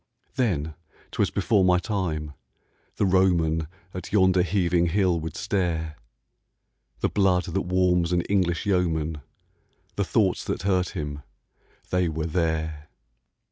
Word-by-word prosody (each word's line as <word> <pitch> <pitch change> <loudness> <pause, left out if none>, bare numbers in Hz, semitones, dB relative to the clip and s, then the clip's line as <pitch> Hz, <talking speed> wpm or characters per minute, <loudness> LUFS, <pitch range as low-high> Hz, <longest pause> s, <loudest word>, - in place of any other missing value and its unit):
Then, 80 - 0 0.4
'twas - - +1
before 100 -4 +2
my 90 -1 +4
time, 85 -7 -2 0.6
the - - +1
Roman 85 -4 +2 0.3
At 90 -1 -7
yonder 95 -3 +4
heaving 90 -2 +1
hill 90 -1 +2
would 80 +1 -6
stare: 85 -6 -1 1.1
The - - +2
blood 95 -3 +2
that 90 +3 -2
warms 90 -2 +2
an 90 -1 +2
English 85 -3 0
yeoman, 80 -6 0 0.8
The - - +2
thoughts - - +1
that - - -3
hurt 90 -2 +1
him, 75 -1 -4 0.7
they 90 -2 +2
were 80 0 -3
there. 80 -2 -2
90 Hz, 125 wpm, -25 LUFS, 80-95 Hz, 1.1 s, my